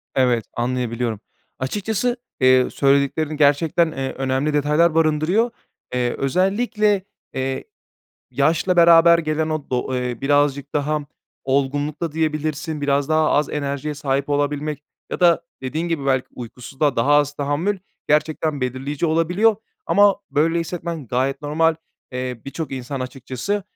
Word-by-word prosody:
Evet, 125 -4 +2
anlayabiliyorum. 120 -2 -2 0.4
Açıkçası, 210 - -1 0.2
eee, 130 -1 +5
söylediklerin 140 +2 +1
gerçekten, 160 +3 +3
eee, 135 -2 -4
önemli 135 +3 -1
detaylar 150 +3 +3
barındırıyor. 165 +9 +2 0.4
Eee, 125 -1 0
özellikle, 200 - +1 0.3
eee, 130 0 -2 0.7
yaşla 175 +3 +1
beraber 170 0 +7
gelen 155 -1 -1
o 155 -2 -4
do 130 +1 -1
eee, 125 -2 -3
birazcık 145 0 +1
daha 150 +1 0 0.4
olgunlukta 145 +4 -1
diyebilirsin. 155 -1 -2
Biraz 140 0 +1
daha 155 0 +3
az 150 0 +2
enerjiye 140 0 -3
sahip 140 -1 -1
olabilmek 145 0 -1 0.3
ya - - -3
da 170 -1 +4 0.2
dediğin 155 +6 -2
gibi 155 -5 -2
belki 130 -1 +1
uykusuzluğa 125 +4 -3
daha 135 +6 +3
az 145 -1 +3
tahammül 145 +8 -1 0.3
gerçekten 150 -1 +1
belirleyici 135 +5 -2
olabiliyor 175 +7 +2 0.3
ama 205 -1 +5
böyle 165 +3 +2
hissetmen 165 -3 -5
gayet 130 +5 -1
normal. 160 +2 +2 0.4
Eee, 125 -2 -4
birçok 145 +2 -5
insan 130 +1 -5
açıkçası 130 +10 -3
145 Hz, 125 wpm, -21 LUFS, 135-165 Hz, 0.7 s, beraber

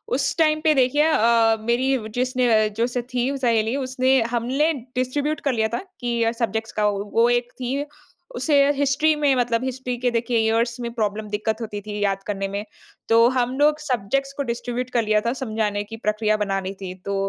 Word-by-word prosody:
उस 270 +1 0
टाइम 310 -2 +3
पे 310 - +6
देखिए 270 +3 +3
अ, 230 -6 +3
मेरी 260 +3 +1 0.3
जिसने 255 -1 +1 0.3
जो 235 - +3
स 250 - -5 0.2
थी 245 +1 +1
सहेली, 230 -2 +1
उसने 260 0 +2
हमने 270 +7 +1 0.2
डिस्ट्रीब्यूट 285 +4 -1
कर - - +1
लिया 220 - +2
था - - -4 0.2
कि 240 -1 -1
अ, 225 - +2
सब्जेक्ट्स 225 0 -1
का। 210 - +3
वो 200 -1 -1
वो 235 +1 +4
एक 245 0 0
थी, 250 +2 -1 0.6
उसे 260 +5 +1 0.2
हिस्ट्री 285 +3 +2
में 290 -2 +2
मतलब 240 -1 0
हिस्ट्री 255 -1 -3
के 245 +1 0
देखिए 235 0 0
इयर्स 235 +2 +1
में 235 - -3
प्रॉब्लम 215 -1 -2
दिक्कत 220 +2 -2
होती 210 -2 -5
थी 210 0 -6
याद 195 -1 0
करने 195 -1 -2
में। 205 +1 -3 0.4
तो 230 +1 +6
हम 250 -1 0
लोग 300 +1 +4
सब्जेक्ट्स 275 0 -1
को 280 - 0
डिस्ट्रीब्यूट 245 +1 -3
कर 235 -2 +1
लिया 215 0 +2
था, 235 +2 -1
समझाने 215 -4 -1
की 225 - -6
प्रक्रिया 215 0 +1
बना 195 -2 -1
ली 190 +1 -5
थी, 185 -1 -5
तो 200 0 -2
240 Hz, 200 wpm, -23 LUFS, 220-260 Hz, 0.6 s, पे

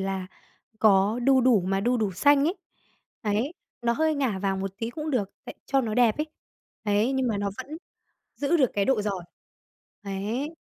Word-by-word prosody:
là 190 -1 -2 0.5
có 205 +1 +4
đu 265 0 +5
đủ 245 -4 +4
mà 195 +2 0
đu 245 +4 +2
đủ 215 -4 0
xanh 285 +8 +4
ấy, 335 +4 +1 0.7
đấy, 220 +7 0 0.3
nó 235 0 +2
hơi 315 +5 +1
ngả 260 -9 0
vàng 195 0 -1
một 195 0 -2
tí 225 +1 -3
cũng 305 +4 -4
được 210 -8 0
tại - - -8
cho 275 -1 +2
nó 220 -4 -2
đẹp 235 -3 +4
ấy, 300 - 0 0.6
đấy, 210 +4 +2
nhưng 265 -2 +1
mà 215 -3 -1
nó 200 0 -1
vẫn 305 +3 -6 0.6
giữ 290 +4 +1
được 265 -7 +3
cái 200 - +2
độ 250 -4 +2
giòn. 195 -4 -3 0.8
Đấy. 215 +10 -3
225 Hz, 190 wpm, -26 LUFS, 200-270 Hz, 0.8 s, đu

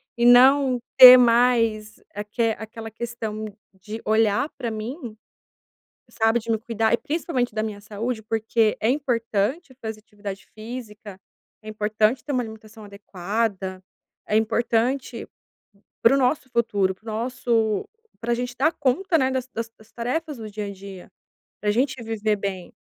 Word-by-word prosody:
e 235 -1 +1
não 255 +1 +6 0.2
ter 255 0 +12
mais 230 -3 +2
aque 215 +3 -1
aquela 225 +1 -8
questão 220 -1 -5 0.3
de 210 +4 -8
olhar 220 +3 +2
para 240 -3 -2
mim, 225 +2 -6 0.9
sabe, 225 +1 +1
de 230 0 -4
me 225 - +2
cuidar 225 0 -1
e - - +4
principalmente 275 -7 -2
da 215 - 0
minha 215 -2 -5
saúde. 220 +3 -4
Porque 220 0 +1
é 220 - +2
importante 250 - -1
fazer 220 -1 -5
atividade 205 -2 -9
física, 215 -3 -9 0.5
é 215 - -8
importante 215 +3 0
ter 290 - -4
uma 255 - +1
alimentação 220 0 -11
adequada, 200 -1 -3 0.5
é 210 - 0
importante 235 +4 0 0.8
para 230 +4 +6
o - - +3
nosso 260 +1 +1
futuro, 205 -6 +1
para 190 - -37
o - - -4
nosso 225 -2 -1 0.3
pra 235 +1 -1
a - - +4
gente 245 +1 -4
dar 300 +6 +2
conta, 320 +6 +1
né, 260 -2 +2
das 260 -1 -2
das 230 -2 -5
das 215 0 -20
tarefas 280 +5 -3
do 220 -1 -7
dia 210 0 -5
a 200 - -6
dia, 195 -1 -11 0.5
para 210 - -2
a - - +4
gente 260 +2 0
viver 220 -1 -1
bem, 195 -3 -5
225 Hz, 155 wpm, -23 LUFS, 215-245 Hz, 0.9 s, ter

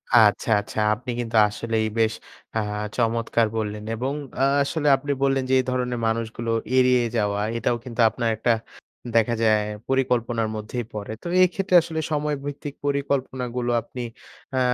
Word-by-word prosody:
আচ্ছা, 110 -1 +5
আচ্ছা। 105 +1 -5 0.2
আপনি 125 +4 -11
কিন্তু 115 -1 -3
আসলেই 110 +1 -1
বেশ 110 -1 +3 0.4
আ - - +3 0.4
চমৎকার 115 -1 +1
বললেন। 105 -1 -3
এবং 130 +5 -2 0.3
আ - - +4 0.2
আসলে 150 +1 -1
আপনি 145 +1 -4
বললেন 135 -1 +2
যে - - +2
এই 130 - 0
ধরনের 125 -1 -1
মানুষগুলো 115 +1 -2 0.3
এড়িয়ে 125 -1 +5
যাওয়া। 105 -2 0 0.2
এটাও 115 +1 +1
কিন্তু 120 -1 -2
আপনার 115 +1 -1
একটা 120 +2 +2 0.6
দেখা 115 +1 +3
যায় 110 -1 +4 0.3
পরিকল্পনার 120 -4 +1
মধ্যেই 110 +3 -4
পড়ে। 105 0 -5
তো - - -5 0.2
এক্ষেত্রে 185 +1 0
আসলে 160 0 -4
সময় 150 0 0
ভিত্তিক 145 0 -6
পরিকল্পনাগুলো 130 -3 -1
আপনি 125 +2 -8 0.6
আ - - +3
120 Hz, 150 wpm, -24 LUFS, 110-135 Hz, 0.6 s, আচ্ছা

